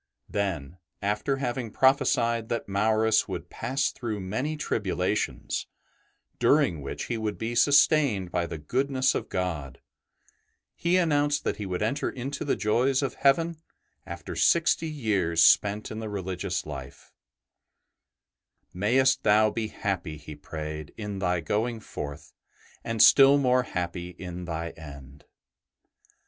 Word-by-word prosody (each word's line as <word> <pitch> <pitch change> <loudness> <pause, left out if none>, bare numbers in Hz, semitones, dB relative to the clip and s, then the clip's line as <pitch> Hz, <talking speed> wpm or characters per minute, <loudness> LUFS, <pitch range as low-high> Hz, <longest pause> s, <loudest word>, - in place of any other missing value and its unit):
'' - - -56
Then, 90 -5 -3 0.2
after 105 +7 0
having 125 -3 -3
prophesied 115 -3 +2
that 115 - -2
Maurus 110 +2 +2
would - - -6
pass 135 +4 -1
through 110 -4 -4
many 125 +11 -3
tribulations, 100 -6 -2 0.7
during 140 - +3
which 70 - -5
he 115 - -3
would 110 -1 -3
be 115 +1 -3
sustained 140 - +4
by 85 0 -1
the 80 - -6
goodness 130 - 0
of - - -4
God, 80 -8 -3 0.9
he 175 +2 +1
announced 145 -4 +2
that - - -1
he 105 - -5
would 90 +1 -2
enter 140 +6 -1
into 135 +3 -5
the 145 - 0
joys 130 +6 +1
of 135 - -2
heaven 165 +4 +2 0.5
after - - -7
sixty 165 -1 +3
years 100 - +1
spent 105 +4 +4
in 110 - -5
the 110 -1 -5
religious 95 -2 -3
life: 70 -2 -9 0.8
'' 65 -2 -52
May 115 +5 +3
est 135 0 +3
thou 110 +1 +4
be 110 -1 -2
happy," 90 -7 -3
he 75 +1 -10
prayed, 75 0 -7
" - - -40
in 105 -3 -5
thy 90 -2 0
going 110 +8 -1
forth, 70 -8 -8 0.5
and 115 -1 +2
still 140 0 +8
more 130 -2 +3
happy 90 -5 -4
in 90 -1 -7
thy 85 -1 -4
end." 70 -2 -12
105 Hz, 140 wpm, -27 LUFS, 90-130 Hz, 0.9 s, still